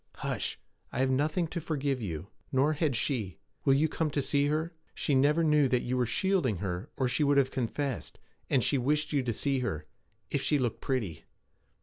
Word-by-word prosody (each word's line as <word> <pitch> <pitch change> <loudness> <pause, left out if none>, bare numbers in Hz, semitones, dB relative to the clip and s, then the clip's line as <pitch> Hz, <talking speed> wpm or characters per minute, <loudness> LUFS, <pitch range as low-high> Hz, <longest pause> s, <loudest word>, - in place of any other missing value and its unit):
Hush! - - -3 0.3
I - - -5
have 130 0 +3
nothing 150 +6 +1
to 170 - -3
forgive 140 -5 -1
you. 85 -8 -5 0.2
Nor 140 +4 +3
had 150 -4 0
she. 110 - -1 0.3
Will 135 - +5
you 155 +3 +3
come 160 0 -1
to 145 0 0
see 145 +1 +2
her? 160 +3 -1 0.2
She 145 - 0
never 145 +5 +4
knew 150 -3 +4
that 125 -1 +1
you 125 - -1
were 125 -2 +1
shielding 150 - +1
her, 90 0 -4
or 130 - +2
she 135 +5 +1
would 145 -1 +3
have 135 -1 +3
confessed; 130 0 -3 0.3
and 130 -3 +3
she 140 - +2
wished 150 +5 +1
you 140 - +3
to 125 -2 -1
see 135 +4 0
her 80 -12 -3 0.5
if - - 0
she 150 - +2
looked 125 -5 -1
pretty.' 105 - -2
135 Hz, 205 wpm, -30 LUFS, 125-150 Hz, 0.5 s, Will